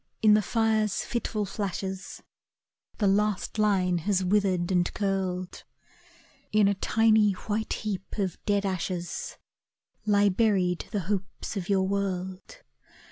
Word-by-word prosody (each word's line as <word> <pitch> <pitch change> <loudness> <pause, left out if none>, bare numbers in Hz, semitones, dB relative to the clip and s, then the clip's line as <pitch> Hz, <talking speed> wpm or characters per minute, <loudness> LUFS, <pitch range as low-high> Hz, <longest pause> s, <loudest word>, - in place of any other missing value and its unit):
in 215 -1 +7
the 215 - +5
fire’s 220 0 +1
fitful 220 -3 -2
flashes, 190 -1 -5 0.7
The 210 - 0
last 205 +1 +1
line 185 -4 +2
has 190 +2 +1
withered 185 -2 +1
and 180 -1 +2
curled. 190 -3 -2 0.9
In 210 -1 +4
a 200 - +3
tiny 215 0 +3
white 215 +3 -3
heap 200 -2 -5
of 190 -4 -2
dead 205 -1 +2
ashes 180 -2 -3 0.7
Lie 205 -1 +4
buried 185 -4 +1
the 205 - -2
hopes 190 +3 -4
of 190 -2 -4
your 195 -1 +3
world. 190 - -3
200 Hz, 125 wpm, -27 LUFS, 185-210 Hz, 0.9 s, in